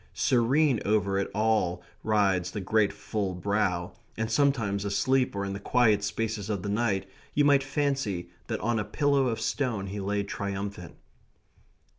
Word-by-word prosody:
Serene 130 Hz, +2 st, +3 dB
over 100 Hz, -2 st, +1 dB
it 100 Hz, -, -2 dB
all 105 Hz, -5 st, +1 dB, 0.2 s
rides 100 Hz, -4 st, +2 dB
the 105 Hz, -, -5 dB
great 105 Hz, +1 st, +2 dB
full 100 Hz, -2 st, -3 dB
brow, 90 Hz, -2 st, 0 dB, 0.3 s
and 110 Hz, +1 st, -2 dB
sometimes 115 Hz, -7 st, +1 dB
asleep 125 Hz, +5 st, +1 dB
or 100 Hz, 0 st, -2 dB
in 100 Hz, -, -3 dB
the 100 Hz, -, -5 dB
quiet 110 Hz, -2 st, +3 dB
spaces 110 Hz, -1 st, -2 dB
of 100 Hz, -4 st, -2 dB
the 100 Hz, -, -3 dB
night 100 Hz, -3 st, 0 dB, 0.3 s
you 145 Hz, -, +4 dB
might 140 Hz, -1 st, +5 dB
fancy 135 Hz, -, -1 dB, 0.2 s
that 110 Hz, -, -2 dB
on 115 Hz, 0 st, +1 dB
a -, -, 0 dB
pillow 140 Hz, +3 st, +1 dB
of 115 Hz, -2 st, -1 dB
stone 120 Hz, -9 st, -1 dB
he 100 Hz, +2 st, -5 dB
lay 100 Hz, +1 st, -1 dB
triumphant. 100 Hz, -2 st, -5 dB
105 Hz, 160 wpm, -28 LUFS, 100-120 Hz, 0.3 s, might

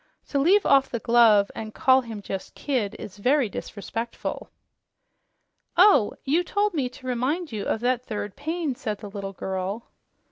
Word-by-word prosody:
To 280 Hz, -, 0 dB
leave 380 Hz, +8 st, +4 dB
off 275 Hz, -1 st, +4 dB
the 235 Hz, -, -2 dB
glove 225 Hz, -4 st, +4 dB
and 215 Hz, -1 st, -7 dB
call 260 Hz, 0 st, +5 dB
him 225 Hz, -4 st, -8 dB
just 195 Hz, -1 st, -6 dB
Kidd 245 Hz, -8 st, -2 dB
is 195 Hz, -1 st, -9 dB
very 255 Hz, +1 st, +2 dB
disrespectful." 225 Hz, +4 st, -5 dB, 1.3 s
"Oh! 360 Hz, -, +6 dB
You 310 Hz, +6 st, +2 dB
told 410 Hz, +3 st, 0 dB
me 275 Hz, -6 st, -1 dB
to 255 Hz, +1 st, -15 dB
remind 260 Hz, +7 st, -1 dB
you 210 Hz, -2 st, -4 dB
of 220 Hz, -, -1 dB
that 250 Hz, 0 st, +1 dB
third 210 Hz, -2 st, -4 dB
pain," 315 Hz, 0 st, -2 dB
said 215 Hz, -4 st, -4 dB
the 205 Hz, -1 st, -9 dB
little 195 Hz, -1 st, -6 dB
girl. 190 Hz, +4 st, -4 dB
240 Hz, 165 wpm, -25 LUFS, 210-285 Hz, 1.3 s, Oh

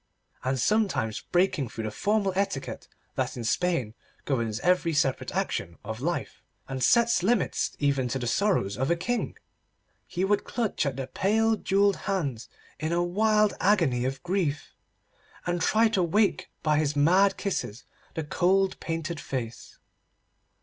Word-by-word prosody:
and 130 Hz, +1 st, 0 dB
sometimes 185 Hz, -, +1 dB
breaking 175 Hz, -8 st, +2 dB
through 110 Hz, -, -6 dB
the 110 Hz, -, -3 dB
formal 200 Hz, -, 0 dB
etiquette 190 Hz, -9 st, -2 dB, 0.3 s
that -, -, -2 dB
in 120 Hz, -, -4 dB
Spain 130 Hz, -2 st, 0 dB, 0.3 s
governs 115 Hz, -6 st, -1 dB
every 180 Hz, -2 st, +2 dB
separate 135 Hz, -3 st, 0 dB
action 85 Hz, 0 st, -2 dB
of 110 Hz, +2 st, -6 dB
life, 170 Hz, +4 st, -3 dB, 0.3 s
and 130 Hz, -1 st, -3 dB
sets 235 Hz, -4 st, +4 dB
limits 215 Hz, +3 st, +1 dB
even 140 Hz, -3 st, +1 dB
to 125 Hz, -, -2 dB
the 125 Hz, -, -4 dB
sorrow 195 Hz, -, +2 dB
of 135 Hz, +2 st, 0 dB
a 170 Hz, -, +3 dB
King, 235 Hz, +8 st, -2 dB, 0.7 s
he 185 Hz, +2 st, -1 dB
would 205 Hz, +1 st, +2 dB
clutch 220 Hz, -, -1 dB
at 135 Hz, -, -2 dB
the 135 Hz, -, -3 dB
pale 220 Hz, +9 st, +2 dB
jewelled 200 Hz, -1 st, +2 dB
hands 140 Hz, -, -2 dB, 0.3 s
in 155 Hz, +1 st, -2 dB
a 175 Hz, +1 st, +2 dB
wild 210 Hz, +3 st, +3 dB
agony 165 Hz, -12 st, +3 dB
of 130 Hz, +1 st, -3 dB
grief, 175 Hz, -5 st, -1 dB, 0.7 s
and 175 Hz, -1 st, -1 dB
try 220 Hz, +6 st, +4 dB
to 200 Hz, -4 st, +1 dB
wake 195 Hz, +4 st, +1 dB
by 150 Hz, -1 st, +3 dB
his 150 Hz, -1 st, 0 dB
mad 185 Hz, +7 st, +4 dB
kisses 125 Hz, -, -3 dB, 0.3 s
the 160 Hz, -, -2 dB
cold 190 Hz, +5 st, +1 dB
painted 165 Hz, -1 st, -3 dB
face. 120 Hz, -5 st, -6 dB
170 Hz, 150 wpm, -27 LUFS, 135-195 Hz, 0.7 s, sets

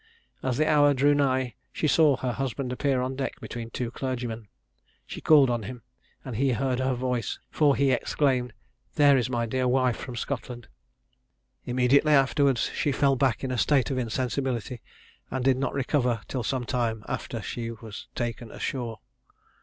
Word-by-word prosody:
As 130 Hz, -2 st, -1 dB
the 155 Hz, -, +2 dB
hour 145 Hz, -1 st, +5 dB
drew 145 Hz, +3 st, +4 dB
nigh, 130 Hz, -4 st, +1 dB, 0.2 s
she 155 Hz, -, -1 dB
saw 150 Hz, -3 st, +4 dB
her 125 Hz, -1 st, -2 dB
husband 130 Hz, 0 st, -3 dB
appear 130 Hz, -1 st, 0 dB
on 130 Hz, +1 st, -3 dB
deck 135 Hz, 0 st, -4 dB
between 115 Hz, -1 st, -6 dB
two 120 Hz, 0 st, -4 dB
clergymen. 120 Hz, -4 st, -4 dB, 0.6 s
She -, -, -8 dB
called 145 Hz, -4 st, +6 dB
on 120 Hz, -1 st, -1 dB
him, 120 Hz, +3 st, -8 dB, 0.4 s
and 125 Hz, -5 st, -5 dB
he 135 Hz, 0 st, +2 dB
heard 130 Hz, +1 st, 0 dB
her 130 Hz, 0 st, +1 dB
voice, 125 Hz, -1 st, -2 dB
for 145 Hz, -3 st, +3 dB
he 140 Hz, -1 st, +2 dB
exclaimed, 125 Hz, -1 st, +1 dB, 0.4 s
"There 145 Hz, -2 st, +6 dB
is 125 Hz, -2 st, +1 dB
my 120 Hz, -2 st, 0 dB
dear 130 Hz, +2 st, 0 dB
wife 125 Hz, -1 st, +2 dB
from 125 Hz, -, -7 dB
Scotland." 120 Hz, -1 st, -5 dB, 1.0 s
Immediately 130 Hz, +5 st, +3 dB
afterwards, 135 Hz, -2 st, +3 dB
she 145 Hz, -, 0 dB
fell 140 Hz, 0 st, +2 dB
back 130 Hz, -3 st, +1 dB
in 130 Hz, -, -2 dB
a 125 Hz, -, -1 dB
state 140 Hz, +4 st, +2 dB
of 130 Hz, -, -1 dB
insensibility, 125 Hz, 0 st, -2 dB, 0.5 s
and 130 Hz, -1 st, -3 dB
did 135 Hz, -1 st, +4 dB
not 135 Hz, -, -2 dB
recover 125 Hz, -4 st, 0 dB
till 130 Hz, -, -3 dB
some 130 Hz, +2 st, -1 dB
time 115 Hz, -3 st, -1 dB
after -, -, -4 dB
she 115 Hz, -1 st, -5 dB
was 110 Hz, -2 st, -9 dB
taken 120 Hz, -1 st, -3 dB
ashore. 120 Hz, -3 st, -4 dB
130 Hz, 170 wpm, -27 LUFS, 120-135 Hz, 1.0 s, called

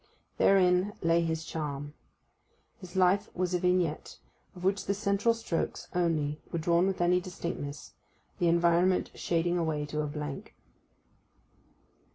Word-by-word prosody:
Therein 185 Hz, +1 st, +4 dB
lay 165 Hz, 0 st, +3 dB
his 160 Hz, -1 st, -2 dB
charm. 145 Hz, -2 st, -5 dB, 0.9 s
His 185 Hz, -2 st, -11 dB
life 190 Hz, +2 st, +3 dB
was 180 Hz, 0 st, -1 dB
a 180 Hz, -, +2 dB
vignette, 180 Hz, -3 st, 0 dB, 0.4 s
of 180 Hz, -, -10 dB
which 195 Hz, +2 st, +1 dB
the 200 Hz, -, 0 dB
central 200 Hz, +3 st, +1 dB
strokes 225 Hz, -7 st, -3 dB
only 155 Hz, -4 st, 0 dB
were -, -, -1 dB
drawn 170 Hz, +3 st, +2 dB
with 190 Hz, -2 st, -1 dB
any 180 Hz, +1 st, +3 dB
distinctness, 170 Hz, -5 st, -6 dB, 0.5 s
the 175 Hz, -, +2 dB
environment 170 Hz, +2 st, +3 dB
shading 175 Hz, +1 st, 0 dB
away 155 Hz, -3 st, -1 dB
to 150 Hz, +1 st, -3 dB
a 150 Hz, -, -2 dB
blank. 150 Hz, -2 st, -6 dB
175 Hz, 135 wpm, -29 LUFS, 160-185 Hz, 0.9 s, Therein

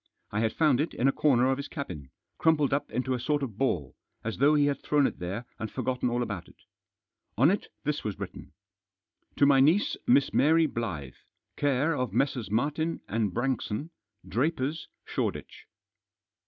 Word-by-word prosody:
I 105 Hz, -, -1 dB
had 110 Hz, 0 st, +1 dB
found 150 Hz, -5 st, +3 dB
it 160 Hz, -, -3 dB
in 130 Hz, -, +2 dB
a -, -, +5 dB
corner 130 Hz, -4 st, +3 dB
of 135 Hz, 0 st, +1 dB
his 140 Hz, -, -5 dB
cabin, 90 Hz, -, -6 dB, 0.3 s
crumpled 150 Hz, -4 st, +3 dB
up 140 Hz, -, -1 dB
into 130 Hz, +1 st, -1 dB
a 125 Hz, -, -1 dB
sort 145 Hz, +3 st, 0 dB
of 110 Hz, -6 st, -6 dB
ball, 85 Hz, -, 0 dB, 0.3 s
as 115 Hz, 0 st, -4 dB
though 145 Hz, +3 st, +5 dB
he 145 Hz, -1 st, +4 dB
had 145 Hz, -1 st, 0 dB
thrown 145 Hz, -2 st, +2 dB
it -, -, -2 dB
there 95 Hz, +7 st, -4 dB
and 110 Hz, -1 st, -3 dB
forgotten 125 Hz, -1 st, -1 dB
all 120 Hz, +1 st, 0 dB
about 105 Hz, -7 st, -5 dB
it -, -, -18 dB, 0.8 s
On 135 Hz, -, +5 dB
it 200 Hz, -, -2 dB, 0.2 s
this 150 Hz, 0 st, -1 dB
was 105 Hz, -3 st, -3 dB
written: -, -, -8 dB, 0.4 s
" -, -, -46 dB
To 140 Hz, -, +5 dB
my 140 Hz, -1 st, +5 dB
niece, 160 Hz, +10 st, +3 dB
Miss 135 Hz, +3 st, +4 dB
Mary 160 Hz, +3 st, +4 dB
Blyth, 90 Hz, -, -5 dB, 0.3 s
care 145 Hz, +3 st, +1 dB
of 125 Hz, -7 st, -2 dB
Messrs. 125 Hz, -2 st, 0 dB
Martin 150 Hz, +9 st, -1 dB
and 110 Hz, -1 st, 0 dB
Branxon, 130 Hz, -, -2 dB, 0.4 s
Drapers, 150 Hz, +3 st, -1 dB, 0.2 s
Shoreditch." -, -, -4 dB
135 Hz, 180 wpm, -28 LUFS, 115-145 Hz, 0.8 s, a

